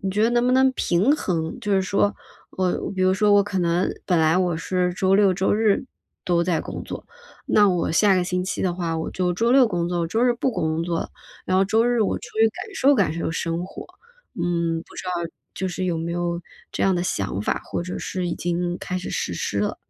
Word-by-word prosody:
你 195 - -2
觉 210 +3 +1
得 230 - +4
能 240 0 +2
不 250 - +3
能 265 0 +5
平 190 +3 +1
衡， 165 - -2
就 205 - -2
是 190 - +3
说 200 +2 +1 0.4
我 185 0 -1
比 185 - 0
如 185 0 +4
说 205 +2 +3
我 205 0 +6
可 200 -2 -3
能 175 +1 +1
本 180 - +2
来 160 +1 +3
我 180 -3 +1
是 180 +1 -1
周 190 +1 +3
六、 195 -3 +4
周 190 +1 +1
日 220 +4 +2 0.4
都 170 -1 +2
在 170 -2 +1
工 - - -7
作， - - -7 0.4
那 205 -1 +5
我 180 -2 0
下 200 +4 +4
个 185 - +2
星 180 0 -1
期 190 - -3
的 180 -2 +1
话 170 -2 -2
我 160 - -3
就 180 -1 -1
周 230 +5 +1
六 260 -1 +6
工 175 -4 -1
作， 175 0 -1
我 165 - 0
周 225 +8 0
日 250 - +4
不 240 +2 -1
工 160 +1 -1
作 170 -1 -1
了。 - - -5 0.4
然 185 - +1
后 195 - +4
周 220 +4 +2
日 245 -1 +2
我 - - 0
出 - - -10
去 225 0 +6
感 420 - -8
受 285 -7 +4
感 190 - +2
受 165 0 -3
生 165 +1 -2
活， - - -9 0.6
嗯， 170 -1 0
不 - - -17
知 - - -6
道 - - -1 0.4
就 190 - -2
是 185 +1 -3
有 170 -2 -1
没 170 +1 -3
有 175 0 -2 0.3
这 - - -1
样 195 - +3
的 175 - 0
想 100 - -2
法， - - -1
或 - - -3
者 180 +1 -5
是 180 -2 -3
已 - - -3
经 175 0 -2
开 185 - -4
始 180 - -5
实 90 - -2
施 100 +3 -2
了？ 105 - -1
180 Hz, 265 characters per minute, -23 LUFS, 170-205 Hz, 0.6 s, 我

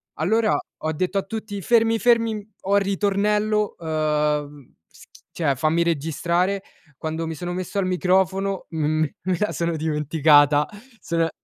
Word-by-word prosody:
Allora 215 +7 +2 0.2
ho 155 - -1
detto 185 +5 -1
a - - -3
tutti: 210 0 -6
"Fermi, 225 +2 +3
fermi, 230 -3 +2 0.2
ho 195 +2 +1
il - - +3
ritornello, 210 +2 +1
uhm 150 -3 -1
schi - - -18 0.2
cioè 145 -5 0
fammi 155 +5 +1
registrare". 170 +4 0 0.4
Quando 160 +1 -3
mi 160 - -3
sono 175 +3 -5
messo 185 +3 -5
al 195 - +1
microfono, 190 +1 +1
m 155 0 +1 0.2
me 185 0 -1
la 210 - 0
sono 170 -1 -1
dimenticata 150 -1 +3 0.3
sono 165 -1 0
175 Hz, 140 wpm, -23 LUFS, 155-200 Hz, 0.4 s, Fermi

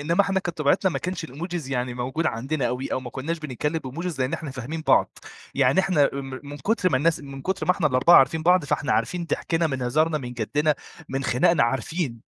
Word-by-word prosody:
إنما 165 +6 +2
إحنا 195 -1 +2
كانت 175 -2 -5
طبيعتنا 180 +6 +2
ما - - -2
كانش 180 -2 -4
الإيموجيز 160 0 -5
يعني 125 -1 -2
موجود 130 +7 -2
عندنا 135 +3 -1
أوي، 125 +3 -3
أو 130 - 0
ما 125 - -8
كناش 160 +7 -3
بنتكلَّم 150 +2 -2
بإيموجيز، 160 +3 -5
لإن 130 +1 0
إحنا 155 -4 -4
فاهمين 135 +5 -5
بعض. - - +3 0.4
يعني 130 +8 +4
إحنا 175 -7 +3
م 135 -1 -6
من 145 0 -8
كتر 190 +3 +1
ما 130 - +3
الناس 160 +4 +1
من 140 -1 -9
كتر 190 +4 -2
ما 180 - +5
إحنا 175 -5 0
ال4 135 +6 +6
عارفين 160 +4 +2
بعض، 180 0 +4
فإحنا 140 -1 0
عارفين 175 -1 0
ضحكنا 165 0 0
من 130 -4 -3
هزارنا، 155 +6 +1
من 125 -3 -6
جدّنا، 145 +6 0 0.3
من 135 +1 -3
خناقنا، 130 +5 +3
عارفين، 130 +1 -2
145 Hz, 215 wpm, -24 LUFS, 130-170 Hz, 0.4 s, ال4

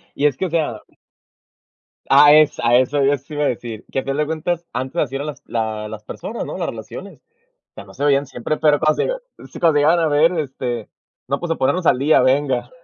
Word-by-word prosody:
Y 145 - 0
es 145 -3 +2
que, 190 - -1
o - - -3
sea 155 -10 -1 1.3
ah, 145 +2 +7
es 155 -1 +4
a 120 0 +3
eso, 135 +2 +1
yo 140 +1 +3
eso 140 +3 -6
iba 150 0 -1
a - - +3
decir, 115 -2 -5
que 135 - -1
al - - -6
final 135 +1 -2
de 150 - +1
cuentas, 165 +2 -3
antes 130 +5 -4
así 135 -2 -3
era 140 +2 -3
las 150 -2 -7
la 110 -2 -3
las 110 0 -9
personas, 225 - -6
¿no?, - - -6
las - - -2
relaciones. - - -9 0.5
O - - -77
sea, - - -10
no - - -15
se 145 - -5
veían 140 -1 +3
siempre, 135 +3 -4
pero 150 -2 +3
cuando 155 0 +2 0.4
se - - -13
sí, - - -11
cuando 165 -2 +4
se - - +4
llegaban 170 +2 +4
a 165 - +2
ver, 155 +4 +3
este, 130 -7 -4 0.4
no, 140 +1 -1
pues, 175 -1 -4
a - - +1
ponernos 175 +6 0
al 125 - +3
día, 145 +1 +4
venga, 130 -2 +1
145 Hz, 245 wpm, -20 LUFS, 125-155 Hz, 1.3 s, ah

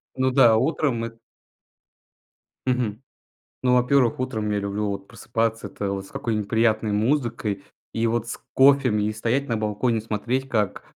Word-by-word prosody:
Ну 130 0 +1
да, 120 -4 +6
утром 130 -2 0
эт 115 0 -9 1.5
Мгм. 125 -4 -1 0.6
Ну, 125 -1 +3
во-первых, 125 0 +3
утром 110 -5 -2
я 105 - +1
люблю 100 +1 -2
вот 100 -1 -4
просыпаться, 115 0 -2
это 100 0 -4
вот 95 0 -4
с - - -16
какой-нибудь 105 -3 -2
приятной 110 -1 +2
музыкой 115 -3 0 0.3
и 115 +1 0
вот 115 0 -1
с - - -5 0.2
кофем, 135 -4 +5
и 105 +1 0
стоять 120 +6 -1
на 115 - 0
балконе, 110 +2 0
смотреть, 120 +5 -2
как 105 -7 -1
115 Hz, 155 wpm, -24 LUFS, 105-125 Hz, 1.5 s, да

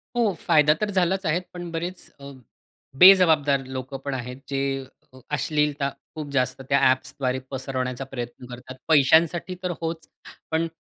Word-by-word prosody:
हो, 230 -5 +2
फायदा 150 -2 +4
तर 210 - 0
झालाच 190 0 +1
आहे. 165 +2 +1
पण 175 -1 -7
बरेच 170 +3 -5
अ, 140 0 -10 0.7
बेजबाबदार 160 -8 +6
लोक 130 +1 -6
पण 140 - -2
आहेत 125 0 -5
जे, 135 -1 -1 0.5
अ, 130 - -14 0.2
अश्लीलता 145 0 0 0.3
खूप 155 -2 -6
जास्त 130 0 0
त्या 140 - +4
ॲप्सद्वारे 130 0 -1
पसरवण्याचा 130 -1 -3
प्रयत्न 120 0 -6
करतात. 125 +1 -9
पैशांसाठी 160 +4 +3
तर 180 - -1
होच, 165 0 -4 0.4
पण 160 +1 +1
145 Hz, 145 wpm, -24 LUFS, 130-170 Hz, 0.7 s, बेजबाबदार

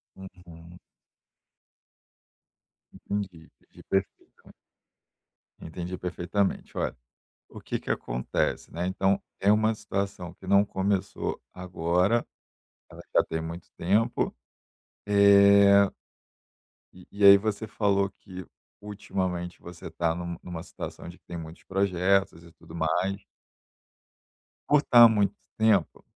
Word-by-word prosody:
Uhum. 90 -2 -14 2.1
Entendi, 95 -5 -5
entendi. - - -26 0.2
Perfeito. 95 -1 -4 1.1
Entendi 90 +2 -6
perfeitamente. 90 +2 -2
Olha - - -2 0.5
o - - -12
que - - -4
que - - -11
acontece, - - -2
né, 85 +2 -3
então 95 +1 +1 0.2
é 100 +1 +3
uma 110 +1 +3
situação 100 -4 -5
que - - -15
não 100 0 +4
começou 95 -1 -2
agora, 90 +4 0 0.7
ela - - -12
já - - +7
tem 80 0 -4
muito 85 +1 -8
tempo. 105 +7 +1 0.7
Eh 100 -1 +6 1.0
e 90 -1 -16
e 100 0 +1
aí 100 0 +10
você 110 +1 -3
falou 100 -2 +1
que 95 -1 -11 0.4
ultimamente 95 -4 -4
você 85 -1 -10
tá 80 0 -1
num 85 -1 -5
numa 85 -2 -7
situação 85 - -8
de 85 - -12
que - - -37
tem 85 - -7
muitos 80 0 -10
projetos 95 -2 0
e 85 - -16
tudo 85 - -14
mais. 90 +4 -1 1.5
Por 150 0 +5
estar 120 -4 +7
há - - +11
muito 100 -3 +1 0.2
tempo 110 -6 +2
95 Hz, 115 wpm, -27 LUFS, 85-100 Hz, 2.1 s, há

